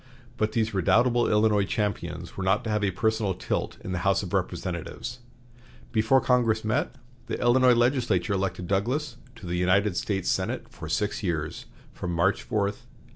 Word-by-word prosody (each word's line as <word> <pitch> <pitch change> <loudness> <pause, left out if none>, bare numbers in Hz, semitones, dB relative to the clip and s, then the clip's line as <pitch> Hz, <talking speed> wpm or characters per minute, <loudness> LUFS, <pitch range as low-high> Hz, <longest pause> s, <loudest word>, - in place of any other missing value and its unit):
But 110 -2 -1
these 110 -1 0
redoubtable 115 +6 +3
Illinois 105 -1 +3
champions 90 -5 -3
were 95 - -4
not 95 +2 +2
to 110 - -3
have 105 -1 0
a 100 - +3
personal 105 0 0
tilt - - -3
in 95 - -5
the 90 - -1
House - - +2
of - - -7
Representatives. 95 +8 -3 0.7
Before 115 +3 +4
Congress 120 -4 +2
met, 110 - 0 0.3
the - - -3
Illinois 125 +1 +5
legislature 120 -7 +2
elected 95 -2 -2
Douglas 120 - -1 0.2
to 115 -5 -12
the 90 0 -2
United 90 +2 +2
States 95 -1 -2
Senate - - -1
for 80 - -8
six 105 +8 -1
years 80 -6 -3 0.3
from 85 -1 -4
March 95 +4 +2
4, 115 - -3
1847. 115 +5 -4
105 Hz, 170 wpm, -26 LUFS, 90-115 Hz, 0.7 s, Illinois